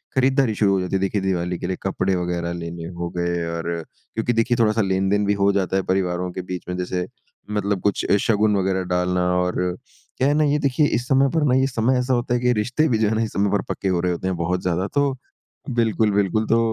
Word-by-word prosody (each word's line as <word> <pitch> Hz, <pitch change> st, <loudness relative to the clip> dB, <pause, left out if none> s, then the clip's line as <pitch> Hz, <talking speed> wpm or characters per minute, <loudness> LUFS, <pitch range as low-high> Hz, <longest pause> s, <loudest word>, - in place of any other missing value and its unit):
खरीदारी 130 Hz, -3 st, +2 dB
शुरू 100 Hz, -1 st, +3 dB
हो 95 Hz, -, +2 dB
जाती 90 Hz, +1 st, -2 dB
है, -, -, +2 dB
देखिए 95 Hz, +1 st, 0 dB
दिवाली 90 Hz, -2 st, -1 dB
के 90 Hz, -, -4 dB
लिए 95 Hz, -, -2 dB
कपड़े 95 Hz, 0 st, 0 dB
वग़ैरह 85 Hz, -1 st, -2 dB
लेने 85 Hz, -1 st, -6 dB
हो 85 Hz, 0 st, -2 dB
गए 85 Hz, -1 st, -1 dB
और 85 Hz, +1 st, -3 dB, 0.4 s
क्योंकि 115 Hz, +2 st, 0 dB
देखिए 115 Hz, +2 st, +1 dB
थोड़ा-सा 110 Hz, 0 st, +3 dB
लेन-देन 95 Hz, +1 st, +1 dB
भी 100 Hz, -, +2 dB
हो 100 Hz, 0 st, +2 dB
जाता 95 Hz, -1 st, 0 dB
है 95 Hz, -, 0 dB
परिवारों 90 Hz, -1 st, -1 dB
के 95 Hz, -, -5 dB
बीच 90 Hz, 0 st, -6 dB
में 90 Hz, -, -2 dB
जैसे 90 Hz, 0 st, -2 dB, 0.4 s
मतलब 100 Hz, -2 st, -1 dB
कुछ 100 Hz, -, 0 dB
ए, 100 Hz, -, +6 dB
शगुन 105 Hz, 0 st, +2 dB
वग़ैरह 95 Hz, 0 st, 0 dB
डालना 90 Hz, 0 st, +1 dB, 0.2 s
और 90 Hz, 0 st, 0 dB, 0.6 s
क्या 130 Hz, -, +2 dB
है 145 Hz, -, +3 dB
ना 155 Hz, +1 st, +3 dB
ये 145 Hz, 0 st, +2 dB
देखिए 145 Hz, +2 st, +2 dB
इस 125 Hz, +2 st, -2 dB
समय 135 Hz, 0 st, +4 dB
पर 155 Hz, -, +2 dB
ना -, -, +4 dB
ये 130 Hz, 0 st, +3 dB
समय 125 Hz, 0 st, +1 dB
ऐसा 125 Hz, +1 st, 0 dB
होता 120 Hz, 0 st, 0 dB
है 120 Hz, -, +2 dB
कि 125 Hz, -, 0 dB
ये 125 Hz, -, +4 dB
रिश्ते 125 Hz, +8 st, +1 dB
भी 115 Hz, -, +2 dB
जो 110 Hz, -1 st, +2 dB
है 110 Hz, -, 0 dB
ना 115 Hz, -, +1 dB
इस 110 Hz, -, -4 dB
समय 100 Hz, 0 st, +1 dB
पर 105 Hz, -, +2 dB
पक्के 95 Hz, -, -3 dB
हो 90 Hz, -2 st, +1 dB
रहे 90 Hz, -, 0 dB
होते 90 Hz, +2 st, -3 dB
हैं 95 Hz, -, 0 dB
बहुत 90 Hz, +2 st, -1 dB
ज़्यादा 90 Hz, +2 st, -1 dB
तो 140 Hz, -2 st, 0 dB, 0.5 s
बिल्कुल, 115 Hz, -3 st, +1 dB
बिल्कुल। 100 Hz, +2 st, +1 dB
तो 115 Hz, -, +3 dB
100 Hz, 250 wpm, -22 LUFS, 90-115 Hz, 0.6 s, ए